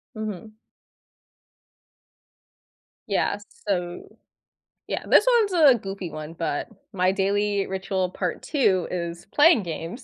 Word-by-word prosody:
Mhm. 215 Hz, -1 st, -6 dB, 2.6 s
Yeah, 200 Hz, 0 st, +1 dB, 0.3 s
so 175 Hz, -3 st, -2 dB, 0.8 s
Yeah, -, -, -3 dB
this -, -, +6 dB, 0.2 s
one's 405 Hz, -3 st, -1 dB
a 290 Hz, -8 st, +6 dB
goofy 195 Hz, -2 st, -6 dB
one, 155 Hz, +1 st, -7 dB
but 165 Hz, 0 st, -3 dB, 0.2 s
my 185 Hz, -1 st, +2 dB
daily 200 Hz, +1 st, 0 dB
ritual 190 Hz, -1 st, -2 dB
part 180 Hz, -1 st, -3 dB
2 195 Hz, -, +1 dB
is 170 Hz, -1 st, -5 dB
playing 295 Hz, -, +5 dB
games. 170 Hz, -, -6 dB
195 Hz, 110 wpm, -24 LUFS, 175-215 Hz, 2.6 s, this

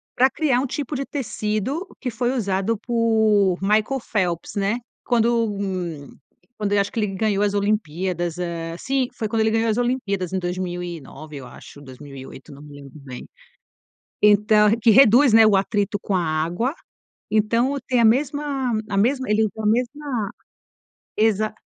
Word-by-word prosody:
pra 260 Hz, +2 st, +4 dB
criar 275 Hz, -6 st, +1 dB
um 275 Hz, -, -1 dB
tipo 285 Hz, +2 st, -4 dB
de 275 Hz, +1 st, -3 dB
tecido 255 Hz, -, -3 dB, 0.2 s
que 255 Hz, -, -2 dB
foi 240 Hz, +2 st, -1 dB
usado 200 Hz, 0 st, -1 dB
por 220 Hz, -5 st, +2 dB
Michael 215 Hz, +7 st, +1 dB
Phelps, 180 Hz, -7 st, -2 dB
né. 200 Hz, +3 st, 0 dB, 0.3 s
Quando 235 Hz, -1 st, +2 dB, 1.1 s
quando 205 Hz, -1 st, -1 dB
eu 200 Hz, -, +4 dB
acho 200 Hz, -, -3 dB
que 230 Hz, -, -3 dB
ele 210 Hz, -, +1 dB
ganhou 200 Hz, +1 st, 0 dB
as 205 Hz, -1 st, +1 dB
Olimpíadas, 180 Hz, -4 st, -1 dB, 0.4 s
sim, 265 Hz, -2 st, 0 dB, 0.2 s
quando 225 Hz, -, -1 dB
ele 220 Hz, 0 st, +2 dB
ganhou 225 Hz, 0 st, +1 dB
as 220 Hz, -, 0 dB
Olimpíadas 210 Hz, -8 st, -1 dB
em 190 Hz, -, 0 dB
2009 175 Hz, -5 st, -6 dB
eu 130 Hz, -, -9 dB
acho, 145 Hz, +3 st, -13 dB
2008, 135 Hz, 0 st, -11 dB
não 140 Hz, -, -13 dB
me 145 Hz, -1 st, -12 dB
lembro 140 Hz, +2 st, -13 dB
bem. 130 Hz, -2 st, -9 dB, 1.0 s
Então 210 Hz, 0 st, +5 dB
que 225 Hz, -, +5 dB
reduz, 255 Hz, +1 st, +6 dB
né, 225 Hz, 0 st, +7 dB
o 205 Hz, -2 st, +4 dB
atrito 205 Hz, +1 st, 0 dB
com 200 Hz, -, -3 dB
a 180 Hz, -, +1 dB
água, 170 Hz, -, -1 dB, 0.6 s
então 230 Hz, +5 st, +1 dB
tem 250 Hz, -2 st, +2 dB
a 230 Hz, -, +5 dB
mesma 275 Hz, +1 st, +1 dB, 0.2 s
a 200 Hz, -, -1 dB
mesma 260 Hz, +4 st, +1 dB
ele 215 Hz, +1 st, +3 dB
a 215 Hz, -, -4 dB
mesma 250 Hz, +3 st, -1 dB, 1.0 s
exa 215 Hz, 0 st, +1 dB
215 Hz, 155 wpm, -22 LUFS, 190-240 Hz, 1.1 s, né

